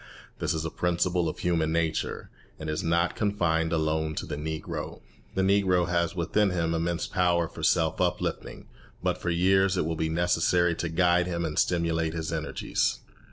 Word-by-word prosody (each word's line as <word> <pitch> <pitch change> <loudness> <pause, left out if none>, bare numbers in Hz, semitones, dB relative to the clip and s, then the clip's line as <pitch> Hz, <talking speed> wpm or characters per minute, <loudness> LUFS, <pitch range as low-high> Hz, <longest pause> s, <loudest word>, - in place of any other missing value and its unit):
This - - 0
is 80 0 -2
a 80 - -3
principle 90 -1 0
of - - -6
human 80 -3 0
nature, 80 -1 -1 0.3
and 80 -1 -4
is 75 - -2
not 85 +1 +1
confined 85 -6 0
alone 80 -1 0
to - - -3
the - - -4
Negro. 80 +1 -5 0.3
The 95 - +2
Negro 95 -2 +3
has 85 0 0
within 100 +4 +1
him 85 -2 0
immense 85 +1 -1
power 85 -2 +1
for - - -10
self - - +2
uplifting, - - -2 0.4
but - - 0
for 85 - -2
years 95 +2 +3
it 90 - +1
will 80 0 -1
be 80 0 -1
necessary 85 +1 +2
to 85 0 -3
guide 90 +1 +3
him 85 -1 -2
and 75 -2 -1
stimulate 80 -2 +1
his 80 -1 -3
energies. - - -1
85 Hz, 175 wpm, -27 LUFS, 80-90 Hz, 0.4 s, Negro